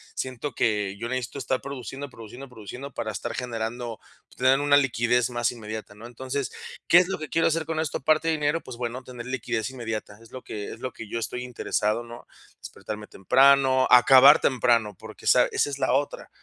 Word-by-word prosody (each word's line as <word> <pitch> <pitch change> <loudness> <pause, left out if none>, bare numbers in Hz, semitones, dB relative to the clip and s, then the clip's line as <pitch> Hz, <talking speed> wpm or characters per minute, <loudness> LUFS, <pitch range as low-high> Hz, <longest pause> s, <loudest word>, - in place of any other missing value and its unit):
siento 130 +2 -4
que 105 -3 0
yo 115 - -4
necesito 130 +2 -4
estar 130 -1 -1
produciendo, 140 +1 -7
produciendo, 120 +3 -11
produciendo 125 +4 -9
para 110 - -4
estar - - -5
generando, 120 -1 -4 0.3
pues, - - -21
tener 130 +2 +4
una 145 0 +4
liquidez 125 -3 +2
más 120 -1 0
inmediata, 110 -2 -8
¿no? 110 +3 -12
Entonces, 130 +2 -4 0.4
¿qué 170 - +8
es 180 0 +5
lo 195 - -3
que 155 -2 -6
quiero 165 +3 +2
hacer 165 -1 0
con 160 0 -3
esto, 160 -2 -2
aparte 155 +3 +2
de 165 - +3
dinero? 150 +1 0
Pues, 130 - -9
bueno, 120 +1 -4
tener 125 -2 -9
liquidez 120 -3 -2
inmediata. 110 -5 -6
Es 115 - -17
lo 130 - -8
que 105 -1 -6
es - - -12
lo 130 - -4
que 115 - -10
yo 115 - -3
estoy 120 +2 -4
interesado, 115 -2 -1
¿no? 120 0 -12 0.3
Despertarme 105 0 -8
temprano, 130 +5 +4
acabar 135 +3 +8
temprano, 120 -5 +2
porque - - -12
esa - - +5
esa - - +1
es 140 -1 -5
la 130 - +1
otra 140 +2 -2
125 Hz, 200 wpm, -25 LUFS, 115-140 Hz, 0.4 s, qué